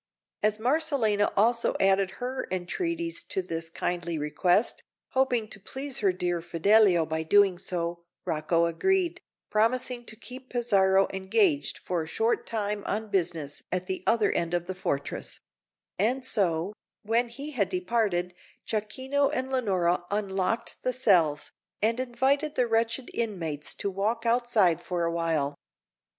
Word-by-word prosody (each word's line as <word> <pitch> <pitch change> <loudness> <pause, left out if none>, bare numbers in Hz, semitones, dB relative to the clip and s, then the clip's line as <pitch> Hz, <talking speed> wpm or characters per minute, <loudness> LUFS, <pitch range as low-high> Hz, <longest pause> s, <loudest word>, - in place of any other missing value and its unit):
As 215 0 +2
Marcellina 240 -5 +1
also 230 +3 +3
added 195 0 +3
her 255 +1 -3
entreaties 335 - -2
to 190 - -2
this 165 -2 -4
kindly 170 0 -2
request, 175 +8 +1 0.3
hoping 250 -4 +1
to 195 - -6
please 265 +6 -5
her 200 -3 +3
dear 175 -1 -1
Fidelio 175 +1 +4
by 160 0 -2
so 160 - -8
doing, 200 -3 +5 0.7
Rocco 165 +2 +1
agreed, 355 - +1 0.3
promising 240 +3 +1
to 220 - -7
keep 255 +3 -10
Pizarro 195 -5 +3
engaged 290 - +1
for 180 -2 -2
a 160 - -6
short 225 +7 0
time 210 -2 -2
on 215 +1 -2
business 165 -6 -1
at 185 0 -1
the 190 0 -4
other 225 -3 +3
end 170 0 0
of 175 0 -1
the 185 - -4
fortress; 145 -6 -3 0.6
and 250 +6 +1
so, 190 -5 0 0.3
when 230 +3 +1
he 280 +5 -7
had 220 -9 0
departed, 220 - 0 0.3
Jacquino 260 +6 0
and 260 +1 -2
Leonora 185 -9 +1
unlocked 200 +1 -1
the 255 - 0
cells, 170 - +3 0.3
and 225 +3 +1
invited 265 +4 0
the 250 - +3
wretched 230 +2 0
inmates 170 -10 -3
to 200 - -3
walk 220 +5 -1
outside 230 -8 +3
for 175 -2 -2
a 170 - +1
while. 165 -4 0
205 Hz, 140 wpm, -28 LUFS, 175-245 Hz, 0.7 s, doing